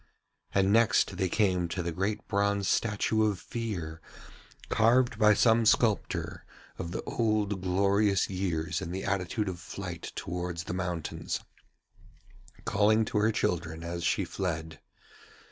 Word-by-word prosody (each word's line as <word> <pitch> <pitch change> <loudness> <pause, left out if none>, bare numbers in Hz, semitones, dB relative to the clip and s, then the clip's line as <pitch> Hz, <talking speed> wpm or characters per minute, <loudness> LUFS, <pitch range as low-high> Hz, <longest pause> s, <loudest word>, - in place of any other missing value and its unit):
And 95 +1 +3
next 115 -1 +3
they 95 - 0
came 90 -3 +2
to 90 +1 -3
the 85 - -2
great 95 +5 -2
bronze 100 -1 +1
statue 110 0 +1
of 100 - -2
Fear, 90 -9 -5 0.7
carved 120 +3 +3
by 105 -1 +6
some 115 +2 +4
sculptor 110 -1 +1 0.4
of 85 - -4
the - - -4
old 105 -4 0
glorious 100 +2 +2
years 85 -3 -2
in 90 - -5
the 95 +2 -4
attitude 100 +2 -1
of 90 -2 -4
flight 85 0 -7
towards 90 -1 -4
the 90 - -5
mountains, 90 -3 -3 1.3
calling 110 +2 +3
to 105 - 0
her 110 +2 +3
children 85 -5 -2
as 85 0 -4
she - - +1
fled. 80 -4 -4
95 Hz, 135 wpm, -29 LUFS, 85-105 Hz, 1.3 s, by